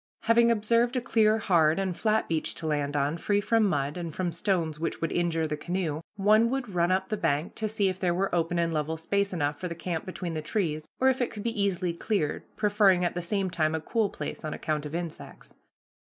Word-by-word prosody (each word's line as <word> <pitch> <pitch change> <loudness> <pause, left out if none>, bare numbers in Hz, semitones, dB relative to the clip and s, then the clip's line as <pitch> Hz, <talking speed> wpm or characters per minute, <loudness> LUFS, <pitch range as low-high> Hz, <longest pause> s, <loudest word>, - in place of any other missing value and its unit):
Having 230 +1 +4
observed 235 +3 +2
a - - +2
clear, 220 -3 +3
hard, 165 -7 +3
and 190 -2 -1
flat 220 +2 +1
beach 160 -1 -1
to 165 - -6
land 145 -2 -1
on, 145 +3 0
free 205 +4 +1
from 225 +2 +2
mud, 145 -4 0
and 170 -2 -4
from 175 +2 -2
stones 165 -3 -1
which 165 - -2
would 165 - -2
injure 170 -2 0
the 150 -1 -2
canoe, 165 -1 -2
one 215 +3 +4
would 250 -5 -3
run 175 0 +2
up 190 +1 0
the 215 - 0
bank 145 -2 0
to 215 -1 -2
see 205 -2 +1
if 185 0 -2
there 180 -2 +1
were 190 +3 -1
open 170 0 +1
and 170 -1 +1
level 155 +1 -1
space 200 +5 0
enough 145 -4 -1
for 180 - -3
the 170 - -5
camp 170 -1 -3
between 180 -2 -5
the 155 - -3
trees, 155 -3 -2
or 260 - +3
if 260 0 0
it 245 - +1
could 210 - -8
be 230 -3 -1
easily 185 -3 0
cleared, 170 -3 -1
preferring 205 -4 +3
at 175 - 0
the 175 - -3
same 190 +1 -1
time 155 -2 +1
a - - -1
cool 215 +6 0
place, - - -6
on 155 - -3
account 150 -1 -2
of 150 - -6
insects. 170 -2 -7
180 Hz, 235 wpm, -28 LUFS, 160-210 Hz, -, Having